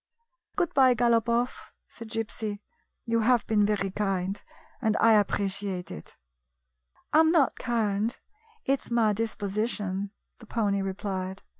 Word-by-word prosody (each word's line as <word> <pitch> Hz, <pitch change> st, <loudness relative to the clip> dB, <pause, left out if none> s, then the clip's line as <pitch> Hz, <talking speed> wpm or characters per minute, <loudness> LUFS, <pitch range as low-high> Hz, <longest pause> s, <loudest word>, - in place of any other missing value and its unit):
"Good 345 Hz, -, 0 dB
bye, 260 Hz, -2 st, +5 dB
Galopoff," 235 Hz, +1 st, +1 dB, 0.2 s
said 230 Hz, -1 st, -11 dB
Gypsy. 220 Hz, -2 st, -3 dB, 0.5 s
"You 230 Hz, -1 st, +1 dB
have 235 Hz, 0 st, +3 dB
been 210 Hz, -2 st, +2 dB
very 200 Hz, -2 st, 0 dB
kind, 195 Hz, -1 st, -2 dB, 0.4 s
and 220 Hz, -3 st, +1 dB
I 225 Hz, 0 st, +5 dB
appreciate 200 Hz, -3 st, 0 dB
it." 75 Hz, -, -10 dB, 0.5 s
" 60 Hz, 0 st, -40 dB
I 310 Hz, -, +7 dB
'm 320 Hz, 0 st, +6 dB
not 320 Hz, -5 st, +3 dB
kind; 225 Hz, -2 st, 0 dB, 0.5 s
it 275 Hz, 0 st, +2 dB
's -, -, -12 dB
my 230 Hz, -3 st, +3 dB
disposition," 205 Hz, -2 st, -2 dB, 0.3 s
the 225 Hz, -, -14 dB
pony 205 Hz, -4 st, 0 dB
replied. 190 Hz, -1 st, -4 dB
215 Hz, 135 wpm, -27 LUFS, 195-235 Hz, 0.5 s, I